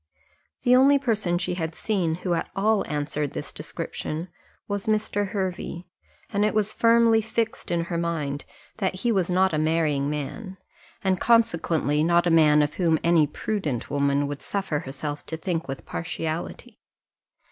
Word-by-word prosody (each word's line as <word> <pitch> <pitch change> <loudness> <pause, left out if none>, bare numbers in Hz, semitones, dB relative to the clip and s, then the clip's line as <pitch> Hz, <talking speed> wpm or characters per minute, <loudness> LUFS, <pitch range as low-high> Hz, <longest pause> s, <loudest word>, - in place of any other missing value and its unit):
The 250 0 +5
only 275 +2 +6
person 215 -10 0
she 180 - -2
had 160 -2 -3
seen, 180 -7 0
who 180 +1 -2
at 165 - -2
all 210 +1 +2
answered 150 -1 -2
this - - -5
description, 160 +4 -5 0.4
was 205 0 -3
Mr. 215 -1 0
Hervey; 185 -3 -4 0.5
and 205 -1 +1
it 210 0 +1
was 215 -1 +1
firmly 230 -1 +4
fixed 225 +1 -2
in 170 -1 +1
her 170 0 -3
mind, 150 -4 -2 0.3
that 190 -3 -2
he 240 - +2
was 190 -5 +1
not 185 0 +3
a 155 - +1
marrying 155 -3 +1
man, 170 +7 -5 0.5
and 190 -2 +1
consequently 165 -10 +2
not 170 +1 +3
a 175 - +2
man 150 -2 +6
of 145 +1 -2
whom 165 -3 +2
any 165 -3 +4
prudent 150 - -3
woman 140 0 +2
would 145 0 -5
suffer 195 -7 -2
herself 145 +2 -5
to 160 - -3
think 165 0 -2
with 135 0 -6
partiality. 170 +7 -5
175 Hz, 160 wpm, -25 LUFS, 155-205 Hz, 0.5 s, only